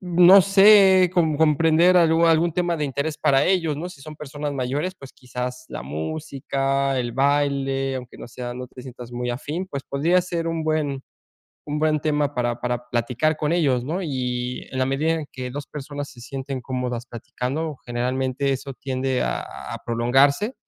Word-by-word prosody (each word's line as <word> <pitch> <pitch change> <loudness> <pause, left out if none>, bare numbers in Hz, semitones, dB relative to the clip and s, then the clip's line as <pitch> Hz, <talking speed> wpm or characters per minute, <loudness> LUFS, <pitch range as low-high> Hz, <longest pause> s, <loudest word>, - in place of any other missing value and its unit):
no 180 +2 +7
sé, 195 -1 +6
com 160 -4 +2
comprender 160 +3 +4
algú 165 -1 +4
algún 165 +1 +3
tema 175 0 0
de 150 - -2
interés 140 +3 -2
para 135 -3 +3
ellos, 175 -5 +1
¿no?, 170 +4 -5
si 160 -6 -13
son 155 +1 -10
personas 145 0 -5
mayores, 140 +7 -2
pues 135 -7 -13
quizás, 125 0 -6
la - - -6
música, 135 - -2
el 120 -2 -2
baile, 135 0 +1
aunque 125 -1 -9
no - - -9
sea 120 +1 -6
no 125 0 -6
te 125 0 -12
sientas 125 -1 -10
muy 125 0 -3
afín, 150 +9 -4
pues, 140 -6 -5
podría 160 +8 +2
ser 170 -2 -3
un 165 -1 -2
buen 150 -4 -1 0.6
un 150 0 -2
buen 155 0 +2
tema 145 -1 0
para 120 -1 -1
para 125 0 -3
platicar 125 +6 0
con 150 - -1
ellos, 135 -8 +2
¿no? 170 +8 -2
Y 125 -5 -3
en 130 - -5
la 130 - +2
medida 145 +5 +1
en 160 -2 -4
que 125 -1 -5
2 145 +2 -6
personas 145 0 -7
se 120 - -14
sienten 135 +1 -5
cómodas 125 -2 -3
platicando, 135 +6 -4
generalmente 130 +3 -1
eso 135 +1 -5
tiende 130 -1 -2
a - - -1
a - - -8
prolongarse 135 - +2
140 Hz, 180 wpm, -23 LUFS, 125-160 Hz, 0.6 s, no